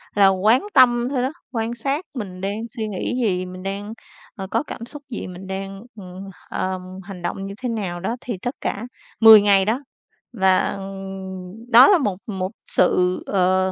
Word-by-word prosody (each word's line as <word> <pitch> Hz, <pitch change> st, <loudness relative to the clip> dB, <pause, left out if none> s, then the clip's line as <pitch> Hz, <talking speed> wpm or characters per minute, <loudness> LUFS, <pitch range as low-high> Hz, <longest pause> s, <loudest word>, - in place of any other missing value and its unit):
là 200 Hz, -1 st, +6 dB
quán 210 Hz, -, +3 dB
tâm 245 Hz, -3 st, +5 dB
thôi 265 Hz, -3 st, 0 dB
đó, 265 Hz, -, 0 dB, 0.2 s
quan 230 Hz, -1 st, -2 dB
sát 275 Hz, +8 st, -2 dB
mình 185 Hz, -6 st, -6 dB
đang 200 Hz, +2 st, -2 dB, 0.2 s
suy 220 Hz, -1 st, -2 dB
nghĩ 195 Hz, -3 st, -3 dB
gì, 185 Hz, -3 st, 0 dB
mình 185 Hz, 0 st, -9 dB
đang, 200 Hz, +2 st, -4 dB, 0.4 s
ờ, 190 Hz, -1 st, -6 dB
có 230 Hz, +4 st, +1 dB
cảm 230 Hz, -, -7 dB
xúc 290 Hz, +3 st, -10 dB
gì, 230 Hz, -, -5 dB
mình 185 Hz, +1 st, -9 dB
đang, 195 Hz, +1 st, -5 dB, 0.2 s
ừm, 185 Hz, 0 st, -9 dB, 0.3 s
ờm, 185 Hz, 0 st, -2 dB, 0.2 s
hành 195 Hz, -2 st, -9 dB
động 195 Hz, +3 st, -3 dB
như 195 Hz, -, -6 dB
thế 250 Hz, -, -2 dB
nào 195 Hz, -6 st, -3 dB
đó, 195 Hz, +7 st, -2 dB
thì 235 Hz, -6 st, -4 dB
tất 245 Hz, +2 st, -3 dB
cả 205 Hz, -, -2 dB, 0.4 s
10 220 Hz, -2 st, +10 dB
ngày 200 Hz, -2 st, +4 dB
đó. 225 Hz, +5 st, +1 dB, 0.5 s
Và 190 Hz, -2 st, +2 dB, 0.9 s
đó 245 Hz, +2 st, +9 dB
là 400 Hz, -, +6 dB
một 205 Hz, -, -1 dB
một 190 Hz, -2 st, -3 dB
sự, 180 Hz, 0 st, +2 dB
ờ, 185 Hz, 0 st, +2 dB
200 Hz, 185 wpm, -22 LUFS, 185-230 Hz, 0.9 s, 10